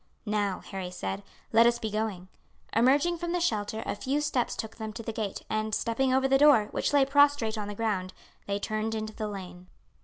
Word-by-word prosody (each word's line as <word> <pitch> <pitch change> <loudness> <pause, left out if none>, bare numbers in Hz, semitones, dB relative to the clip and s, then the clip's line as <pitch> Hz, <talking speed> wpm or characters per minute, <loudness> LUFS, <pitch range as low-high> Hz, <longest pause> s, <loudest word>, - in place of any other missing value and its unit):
"Now," 205 -3 -1
Harry 190 -2 -6
said, 185 +2 -4 0.3
"let 230 +1 +7
us 235 0 +3
be 220 -2 -4
going." 210 -4 -2 0.5
Emerging 285 +9 +3
from 345 0 -2
the 355 - +1
shelter, 220 -8 -1
a - - -1
few 270 +7 -1
steps 295 -5 0
took 220 0 -6
them 220 -1 -5
to 230 +1 -7
the 225 - -4
gate, 215 -3 -4
and 215 0 -1
stepping 255 +3 0
over 265 +1 +3
the 270 0 +4
door, 275 -8 +6
which - - -1
lay 285 -2 +5
prostrate 285 -5 +3
on 210 -2 -4
the 205 - -5
ground, 200 -4 -1 0.4
they 200 0 0
turned 215 +2 -2
into 215 0 -4
the 215 -1 -4
lane. 185 -3 -8
220 Hz, 210 wpm, -28 LUFS, 205-265 Hz, 0.5 s, let